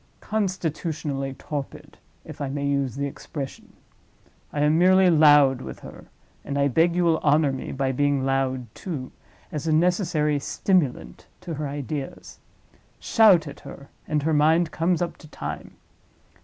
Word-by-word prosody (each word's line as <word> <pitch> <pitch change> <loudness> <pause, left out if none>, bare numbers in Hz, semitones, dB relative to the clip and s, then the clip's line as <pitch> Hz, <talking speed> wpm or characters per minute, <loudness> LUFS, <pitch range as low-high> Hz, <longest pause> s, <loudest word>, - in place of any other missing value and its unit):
Constitutionally 160 -8 -3
torpid—if 145 +1 -9
I 140 - -2
may 140 +1 -3
use 140 -3 -1
the 140 +1 -2
expression. 140 0 -7 0.8
I 145 - -2
am 150 +1 +3
merely 185 0 +5
loud 145 -4 +5
with - - -8
her - - -11 0.4
(and 140 - -4
I 140 0 +2
beg 165 +6 +2
you 180 - +2
will 165 -1 +3
honor 150 -1 +3
me 135 - -5
by 135 0 -1
being 140 0 +1
loud, 135 -1 0
too) 145 -9 -6 0.4
as 150 +1 -4
a - - +2
necessary 155 -3 +1
stimulant 170 -3 -1
to 170 - -6
her 150 -1 -3
ideas. 140 0 -6 0.6
Shout 195 -9 +4
at 140 - -9
her—and 140 +2 -6
her 160 +1 +1
mind 160 +3 +3
comes 170 +1 0
up 170 - -5
to 155 - -14
time. - - -7
150 Hz, 145 wpm, -24 LUFS, 140-165 Hz, 0.8 s, merely